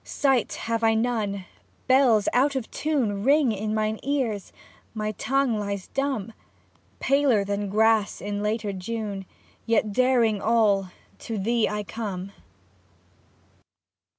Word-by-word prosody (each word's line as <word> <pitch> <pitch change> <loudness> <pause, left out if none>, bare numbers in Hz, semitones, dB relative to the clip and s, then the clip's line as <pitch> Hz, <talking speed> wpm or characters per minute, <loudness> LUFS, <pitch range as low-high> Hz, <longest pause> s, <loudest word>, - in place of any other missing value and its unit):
Sight 270 -5 +1
have 230 0 -3
I 225 0 +4
none, 220 -5 -1 0.4
bells 255 -5 +4
out 275 +3 +3
of 260 -4 -4
tune 240 -10 -1
Ring 280 -1 +4
in 215 +1 -3
mine 215 0 -1
ears, 255 -8 -2 0.4
my 215 0 -2
tongue 250 +1 0
lies 200 -2 -4
dumb; 265 -6 -2 0.7
Paler 270 -7 +2
than 200 0 -2
grass 220 0 +2
in 205 +1 -4
later 210 -1 -1
June, 200 0 -5 0.4
Yet 220 -2 +2
daring 235 -4 +3
all 210 -4 +2 0.3
(To 225 -2 -5
thee 230 +3 +1
I 210 0 -3
come). 200 -3 -5
220 Hz, 125 wpm, -25 LUFS, 205-245 Hz, 0.7 s, I